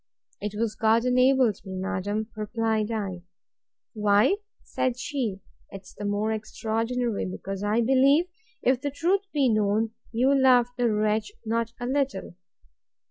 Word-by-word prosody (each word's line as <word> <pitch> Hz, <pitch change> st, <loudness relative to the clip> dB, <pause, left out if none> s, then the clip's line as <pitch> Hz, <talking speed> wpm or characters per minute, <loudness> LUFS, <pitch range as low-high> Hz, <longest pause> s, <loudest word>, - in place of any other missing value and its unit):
It 210 Hz, 0 st, -4 dB
was 225 Hz, -1 st, 0 dB
God 225 Hz, +2 st, +2 dB
enabled 255 Hz, -3 st, +3 dB
me, 190 Hz, -1 st, -7 dB
madam, 205 Hz, +3 st, -2 dB
replied 220 Hz, 0 st, -1 dB
I. 200 Hz, -5 st, -3 dB, 0.7 s
Why, 210 Hz, -, +3 dB, 0.3 s
said 255 Hz, -1 st, -1 dB
she, 250 Hz, -8 st, -3 dB, 0.3 s
'tis 195 Hz, -1 st, -11 dB
the 205 Hz, -, -7 dB
more 205 Hz, +2 st, 0 dB
extraordinary, 225 Hz, +1 st, -2 dB
because 195 Hz, +1 st, -6 dB
I 210 Hz, +3 st, +2 dB
believe, 270 Hz, +6 st, +4 dB, 0.4 s
if 255 Hz, 0 st, +2 dB
the 285 Hz, -, -1 dB
truth 345 Hz, +7 st, +1 dB
was 275 Hz, -5 st, +2 dB
known, 215 Hz, +1 st, +1 dB, 0.2 s
you 250 Hz, +4 st, +3 dB
loved 255 Hz, -3 st, +4 dB
the 245 Hz, -2 st, +1 dB
wretch 215 Hz, -, 0 dB
not 230 Hz, +1 st, -1 dB
a 245 Hz, -, -4 dB
little. 265 Hz, -9 st, -1 dB
225 Hz, 135 wpm, -26 LUFS, 210-255 Hz, 0.7 s, believe